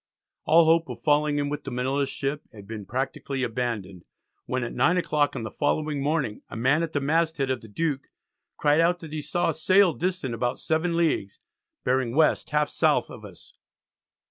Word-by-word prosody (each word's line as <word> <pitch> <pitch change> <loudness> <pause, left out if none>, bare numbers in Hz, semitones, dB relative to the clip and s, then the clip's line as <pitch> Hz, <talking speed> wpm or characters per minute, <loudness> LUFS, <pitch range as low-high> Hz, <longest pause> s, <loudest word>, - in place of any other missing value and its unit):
All 165 +2 +6
hope 165 -1 +3
of 125 - -6
falling 150 0 +2
in 145 0 0
with 150 +1 -4
the - - -5
Manila 135 +3 -1
ship 140 +2 -3
had 105 -4 -12
been 105 -3 -7
practically 130 +1 -3
abandoned, 115 -7 -3 0.4
when 130 -1 -1
at 120 - -4
9 165 +8 +3
o'clock 150 -4 +1
on - - -4
the 110 - -5
following 150 0 -1
morning 140 -7 -1
a - - -7
man 135 +7 +2
at 165 -1 -3
the 145 - +1
masthead 155 -1 +1
of 130 - -2
the 115 - -12
Duke 140 +4 -2 0.5
cried 150 +2 +3
out 175 +1 +3
that 160 -2 -9
he 155 - -3
saw 175 +4 0
a - - -5
sail 185 +2 +4
distant 180 -8 -2
about 120 +2 -2
7 165 +2 0
leagues 155 -12 0 0.4
"bearing 125 -1 0
West 160 0 +3
half 150 -1 +1
south - - +1
of - - -10
us." - - -13
145 Hz, 195 wpm, -26 LUFS, 125-160 Hz, 0.5 s, All